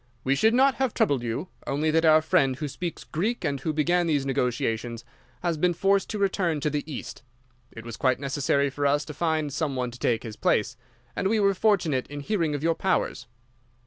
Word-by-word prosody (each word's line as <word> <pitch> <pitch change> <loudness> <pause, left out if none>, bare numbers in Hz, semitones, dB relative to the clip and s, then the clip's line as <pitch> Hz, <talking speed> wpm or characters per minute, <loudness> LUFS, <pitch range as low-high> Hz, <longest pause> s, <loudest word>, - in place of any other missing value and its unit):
We 135 - +2
should 220 +11 +3
not 270 +2 +5
have 265 -4 0
troubled 140 -4 +2
you, 120 +9 -4 0.2
only 150 +3 0
that 165 +1 +2
our 155 0 +6
friend 155 -6 +2
who 150 +3 -4
speaks 170 +4 -5
Greek 215 +10 -2
and 140 -1 -1
who 155 +4 -2
began 170 +3 +1
these 145 -4 +1
negotiations 120 -3 -1 0.4
has 170 -2 0
been 175 +2 +1
forced 195 +2 +2
to 215 - -3
return 190 -5 0
to 150 - 0
the 145 0 -1
East. 135 - -7 0.5
It 115 0 -10
was 115 -2 -7
quite 130 -1 +1
necessary 140 0 0
for 145 +1 0
us 145 +1 +1
to 150 - -7
find 155 -3 -1
some 145 -3 -1
one 125 -1 -2
to 120 - -12
take 115 -2 0
his 110 -2 -8
place, - - +1 0.4
and - - 0
we 220 +2 +2
were 200 -1 +3
fortunate 180 - +1
in 145 0 -7
hearing 165 -3 0
of 145 - -5
your 165 0 +3
powers. 190 -6 -1
150 Hz, 210 wpm, -26 LUFS, 135-180 Hz, 0.5 s, our